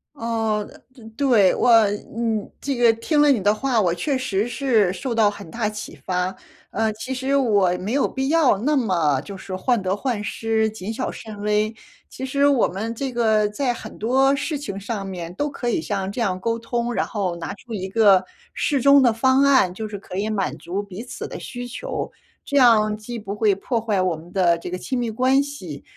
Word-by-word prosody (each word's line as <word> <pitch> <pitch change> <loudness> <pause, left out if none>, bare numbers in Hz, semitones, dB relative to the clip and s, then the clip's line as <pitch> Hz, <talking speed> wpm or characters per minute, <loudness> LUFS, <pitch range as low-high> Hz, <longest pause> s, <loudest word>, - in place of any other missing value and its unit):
哦， 225 -4 -1
呃 250 -4 -16
对， 235 -8 +4
我 230 -3 +5 0.3
你 225 -2 -2
这 275 -1 -2
个 240 -1 +5
听 295 +7 +1
了 295 - +5
你 240 -7 +2
的 205 +2 +3
话， 245 +1 0
我 175 -4 +2
确 270 - -1
实 220 -5 -1
是 230 -6 +2
受 240 +5 -4
到 215 -2 +4
很 200 -4 -10
大 220 +3 -1
启 215 0 -7
发， 185 +1 -1 0.4
呃， 220 +1 0
其 255 +5 -5
实 265 +2 -1
我 210 -8 +3
没 200 +6 -3
有 280 - +2
必 265 0 -3
要 305 -8 +4
那 285 +9 +1
么， 170 - +1
就 200 -1 -9
是 190 0 -6
患 235 +4 +1
得 190 0 0
患 230 0 -2
失， 220 +1 0
谨 215 0 -6
小 - - -3
慎 215 -2 -9
微， 210 +1 +1 0.4
其 265 - -6
实 280 +2 +1
我 280 -4 +4
们 215 +5 -4
这 260 +2 -4
个 220 -3 +2
在 245 +4 -1
很 220 -2 -10
多 265 +5 +3
事 290 +2 -2
情 200 -9 -6
上 200 0 -4
面 175 -2 -6
都 290 +8 -1
可 245 -3 -3
以 225 - 0
像 195 +3 -3
这 225 - -6
样 195 -6 0
沟 230 +4 -1
通， 235 +1 -2
然 - - 0
后 190 -6 -2
拿 170 - -5
出 230 +3 -11
一 190 -3 -3
个 195 -2 +4 0.3
适 280 -3 0
中 280 +2 +7
的 240 -3 +4
方 260 +4 +3
案， 260 -10 +4
就 220 +3 -5
是 210 -1 -6
可 190 -1 -8
以 210 +2 -1
满 200 -3 -2
足 185 +4 -4
彼 200 0 -8
此 250 - -7
的 - - -7
需 245 -1 -7
求， 245 - -5 0.3
这 285 - -1
样 215 -5 +5
既 235 +3 -7
不 205 -3 -6
会 210 -1 +2
破 230 +5 -2
坏 210 -4 0
我 180 -3 0
们 170 +3 -14
的 175 -3 +3
这 170 - -7
个 180 - -3
亲 255 +7 -3
密 240 -1 -1
关 255 +5 +3
系， 190 - -7
220 Hz, 235 characters per minute, -22 LUFS, 195-255 Hz, 0.4 s, 中